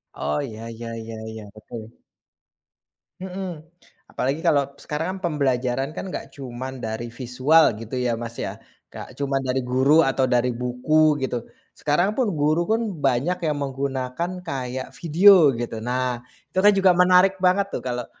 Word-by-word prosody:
Oh, 75 +1 -2
ya 115 -3 -7
ya 115 0 -7
ya 115 0 -7 0.2
ya, 110 -1 -8
betul. 110 +1 -11 1.2
Mhm, 185 -3 -5 0.5
apalagi 140 +5 -2
kalau 140 -3 +2
sekarang 165 +6 -3
kan 165 -5 -2
pembelajaran 130 0 0
kan 190 - -6
nggak - - -7
cuman 130 -1 -7
dari 115 +1 -5
visual 130 +6 +3
gitu 115 +2 -10
ya, 120 -2 0
Mas, 115 0 -6
ya. - - -4 0.3
Nggak - - -9
cuman 135 -1 0
dari 130 +1 0
guru 130 +6 +4
atau 135 -1 +2
dari 125 0 +2
buku 140 +5 +2
gitu. 120 -3 -2 0.3
Sekarang 175 +8 +1
pun 255 -5 +2
guru 155 +3 +1
pun 225 +1 +2 0.2
banyak 140 +7 +1
yang 150 -2 0
menggunakan 135 +4 -3
kayak 130 -2 -4
video 170 -1 +6
gitu. 115 -1 -4
Nah, 125 0 -1 0.3
itu 185 - -11
kan 210 - +8
juga 195 -1 +5
menarik 180 +1 +5
banget 190 +2 +3
tuh - - -2
kalau, 125 -1 -2
135 Hz, 155 wpm, -23 LUFS, 125-165 Hz, 1.2 s, kan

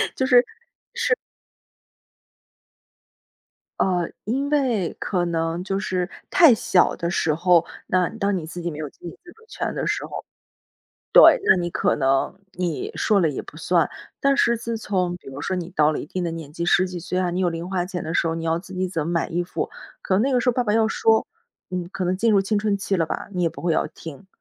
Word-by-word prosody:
就 - - -1
是 250 -2 +6 0.5
是。 470 0 +2 2.6
呃， 180 -3 +1 0.2
因 270 +7 -1
为 250 - +1
可 180 -3 -1
能 165 0 -1
就 195 0 -2
是， 185 -2 -2 0.2
太 330 -8 +7
小 190 -4 +2
的 170 - -2
时 160 -2 +1
候， 170 +1 +3 0.2
那 185 -1 +2
当 200 -3 -1
你 160 - -5
自 170 +2 -8
己 175 - -2
没 150 - -7
有 155 -2 -5
自 - - -30
己 175 - -7
自 345 - -13
主 450 - -22
权 - - -4
的 - - -2
时 - - -1
候 - - -7 0.9
对。 - - +8
那 - - +6
你 175 -1 -2
可 - - +1
能， 135 +3 +1
你 175 -4 -3
说 205 -2 +2
了 160 -4 +2
也 135 - -4
不 150 - -12
算。 170 0 +2 0.3
但 275 0 +3
是 235 -3 +3
自 230 0 -3
从 185 -5 -1
比 175 - -14
如 135 +1 -8
说 185 +5 -2
你 175 -1 -5
到 150 -4 +3
了 155 - -2
一 - - -5
定 180 +5 -4
的 170 - -1
年 160 -3 -7
纪， 170 +2 -3
十 185 +1 +4
几 180 -1 -6
岁 180 +2 -3
啊， 180 -1 0
你 180 - -2
有 180 - +2
零 170 +2 -5
花 180 -2 -1
钱 180 -2 -5
的 160 - -4
时 170 - +1
候， 165 - 0
你 165 0 -4
要 165 0 +1
自 190 +2 -10
己 185 +1 -1
怎 165 -4 -3
么 - - -2
买 170 -1 0
衣 175 +2 -1
服。 175 - -4 0.3
可 185 - 0
能 - - +3
那 275 - +1
个 255 - +3
时 250 - +3
候 - - -3
爸 250 +1 +1
爸 210 -2 0
要 225 -1 +4
说， 220 0 +2 0.4
嗯， 180 -1 -2
你 - - -11
可 190 0 -4
能 180 +1 +1
进 225 +4 +2
入 200 -2 +4
青 205 +2 0
春 205 -1 0
期 195 0 -1
了 165 -3 +1
吧， - - -5
你 180 -2 -1
也 170 - +3
不 - - -11
会 170 - +1
要 - - +1
听。 160 +3 -11
180 Hz, 255 characters per minute, -23 LUFS, 170-210 Hz, 2.6 s, 对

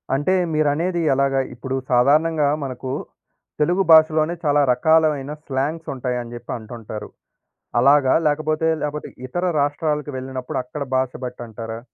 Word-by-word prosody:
అంటే, 145 +7 +1 0.2
మీరనేది 155 +4 +1
ఎలాగా? 135 0 +2
ఇప్పుడు 130 +2 -4 0.2
సాధారణంగా 150 +5 +3 0.2
మనకూ 130 -1 -5 0.7
తెలుగు 175 +6 +2
భాషలోనే 155 +1 +5
చాలా 145 -1 +3
రకాలు 160 +5 +4
అయిన 135 +1 -7
స్లాంగ్సుంటాయని 130 -4 -3
జెప్పి 120 0 -7
అంటుంటారు, 110 -2 -8 0.7
అలాగా, 140 +1 +5
లేకపోతే, 155 +2 +1
లేపోతే 150 0 -3 0.2
ఇతర 175 +8 -3 0.2
రాష్ట్రాలకు 150 +1 -1
వెళ్ళినప్పుడు 130 -1 -5
అక్కడ 145 +3 -6
భాష 130 -1 0
బట్టంటారా? 115 -2 -7
140 Hz, 115 wpm, -21 LUFS, 125-155 Hz, 0.7 s, భాషలోనే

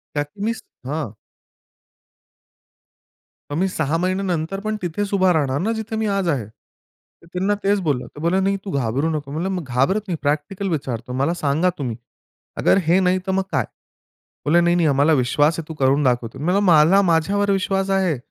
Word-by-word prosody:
त्यात 145 0 -1 0.2
मी 225 +2 +1
स 225 - -10 0.3
हां. 150 -2 -2 2.4
मग 145 - -2
मी 190 +3 +2
6 160 -4 -1
महिन्यानंतर 185 0 -1
पण 215 0 -1
तिथेच 195 +4 -3
उभा 190 -2 +4
राहणार 140 -4 0
ना 215 +7 0
जिथे 220 0 -4
मी 220 - 0
आज 195 -2 0
आहे. 135 -9 0
तर 115 +8 -28
त्यांना 190 +3 +1
तेच 200 +1 +2
बोललो. 145 -7 -1
ते - - -13
बोलले 170 +4 +2
"नाही 195 +1 +1
तू 195 - -4
घाबरू 135 +3 0
नको" 150 -3 -4
म्हणलं 180 +4 -2
"घाबरत 135 - +1
नाही 180 - -1
प्रॅक्टिकल 150 +7 -1
विचारतो. 125 -6 -3
मला 140 +6 +1
सांगा 155 +2 +1
तुम्ही, 125 -6 -3 0.6
अगर - - +3
हे 175 +3 +5
नाही 185 0 +2
तर - - +1
मग 190 0 +1
काय?" 130 -4 +1 0.8
बोलले, 165 +4 +4
"नाही, 175 0 +3
नाही 170 -2 +3
आम्हाला 145 +2 +3
विश्वास 145 +4 +2
आहे 160 - -7
तू 160 - -6
करून 135 +2 +3
दाखवतो." 125 -1 0
म्हणलं 180 +7 +1
"मला 165 +5 +6
माझ्यावर 200 +3 +2
विश्वास 195 0 0
आहे. 190 -6 +1
165 Hz, 180 wpm, -21 LUFS, 145-190 Hz, 2.4 s, मला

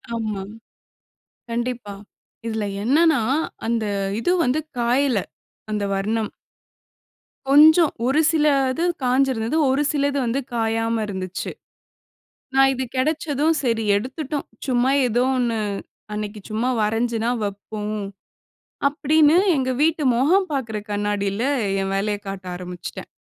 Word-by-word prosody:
ஆமா. 215 -4 -3 1.1
கண்டிப்பா. 235 -3 -3 0.5
இதுல 220 -2 -2 0.2
என்னன்னா, 300 +3 +4 0.5
அந்த 230 -2 0 0.4
இது 350 - +1
வந்து 260 +5 +1 0.2
காயல, 245 0 +2 0.5
அந்த 210 -1 -1
வர்ணம். 215 +2 -1 1.2
கொஞ்சம், 310 +3 +7
ஒரு 275 +4 +2
சில 305 -2 +2 0.3
இது 325 +6 -2 0.2
காய்ஞ்சிருந்தது. 255 0 +1
ஒரு 275 +2 +1
சில 285 -1 +1
இது 280 - -1
வந்து 240 +3 0
காயாம 225 0 0
இருந்துச்சு. 190 -2 -4 1.0
நா 270 - +6
இது 260 0 -2
கெடைச்சதும், 305 +2 +1
"சரி 230 -3 0
எடுத்துட்டோம், 265 +6 -4 0.2
சும்மா 255 +1 +2 0.2
எதோ 240 +3 +2
ஒண்ணு 235 -2 0 0.6
அன்னைக்கு 210 0 -5
சும்மா 230 +4 0
வரைஞ்சுதான் 230 +2 0
வைப்போம்." 210 +1 -4 0.9
அப்டீன்னு 300 +2 +3 0.2
எங்க 260 -1 0
வீட்டு 320 0 +2
முகம் 370 +9 +3
பாக்குற 235 -6 -2
கண்ணாடியில, 205 0 -1 0.4
என் 195 0 -2
வேலையக் 205 +1 -2
காட்ட 195 -1 -6
ஆரம்பிச்சுட்டேன். 180 -1 -7
235 Hz, 110 wpm, -22 LUFS, 215-280 Hz, 1.2 s, கொஞ்சம்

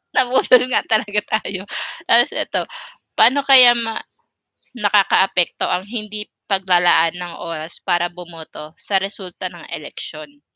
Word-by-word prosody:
nabudol 255 -1 +4
nga - - +2
talaga 210 -1 +1 0.2
tayo, 190 -2 -6 0.4
'tas - - +4
eto, - - -2 0.5
paano 280 +2 +4
kaya 255 -3 +7
ma 225 -1 -3 0.8
nakakaapekto 195 -4 +1
ang 180 +1 -1
hindi 210 -1 -5 0.2
paglalaan 175 -4 +2
ng 175 -1 -7
oras 165 -1 -7
para 175 -1 0
bumoto 165 -3 -11
sa 195 - -1
resulta 190 -2 -7
ng 170 -2 -13
eleksyon. 150 -1 -9
190 Hz, 120 wpm, -19 LUFS, 175-215 Hz, 0.8 s, kaya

